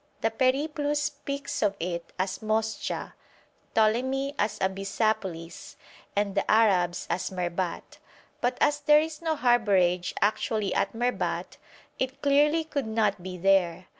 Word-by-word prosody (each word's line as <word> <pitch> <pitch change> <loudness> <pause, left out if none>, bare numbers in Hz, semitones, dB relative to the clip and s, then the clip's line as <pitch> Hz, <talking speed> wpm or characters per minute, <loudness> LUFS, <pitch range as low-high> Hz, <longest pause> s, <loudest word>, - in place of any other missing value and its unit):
The 225 - +1
'Periplus' 290 +4 +1
speaks 285 -1 -4
of 200 -1 +2
it 170 0 -4
as 185 +1 -2
Moscha, 220 0 -2 0.6
Ptolemy 260 +6 +2
as 210 +1 0
Abyssapolis, 195 -3 -2 0.4
and 200 -1 0
the - - -1
Arabs 185 -5 +3
as 185 - -2
Merbat; 180 -1 -4 0.4
but 245 +1 0
as 290 0 +3
there 300 0 +6
is 315 0 -4
no 320 -1 0
harbourage 200 -9 +2
actually 210 0 0
at 200 - 0
Merbat, 245 +2 -2 0.4
it 260 +1 -2
clearly 295 +3 +4
could 285 -6 -3
not 215 -4 0
be 180 0 -6
there. 185 -1 +2
220 Hz, 130 wpm, -27 LUFS, 190-275 Hz, 0.6 s, there